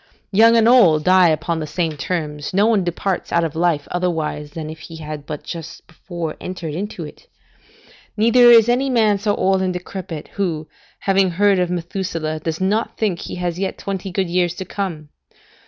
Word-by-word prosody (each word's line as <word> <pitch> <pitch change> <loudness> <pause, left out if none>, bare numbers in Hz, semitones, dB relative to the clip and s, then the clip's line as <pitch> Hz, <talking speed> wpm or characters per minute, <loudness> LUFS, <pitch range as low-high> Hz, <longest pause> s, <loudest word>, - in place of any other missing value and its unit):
Young 225 +3 +6
and 225 0 +4
old 180 -12 +5
die 185 0 +5
upon 160 +1 -1
the 155 - -4
same 165 0 -2
terms; 150 0 -4
no 200 +2 +4
one 220 -4 +3
departs 180 +2 -2
out 170 - +2
of 160 -1 -3
life 165 -3 0
otherwise 160 -4 -2
than 155 +1 -7
if 155 0 -8
he 165 - -10
had 155 -2 -7
but 150 -1 -6
just 165 -2 -8
before 170 -4 -6
entered 175 -4 -5
into 200 +6 -5
it; - - -13 0.9
neither 235 +3 +5
is 230 -2 +7
any 255 +3 +1
man 220 -5 +3
so 205 0 0
old 190 0 +1
and 185 -1 0
decrepit, 180 -3 -7
who, 165 -6 -3 0.3
having 195 -1 +2
heard 195 +2 +3
of 180 -1 0
Methuselah, 170 -3 -3
does 160 0 -4
not 205 +4 -1
think 200 -6 0
he - - -6
has 180 -1 -3
yet 195 -1 -2
twenty 195 -1 -4
good 190 +1 -1
years 175 0 0
to 190 - -6
come. 170 -8 -5
180 Hz, 190 wpm, -20 LUFS, 160-195 Hz, 0.9 s, is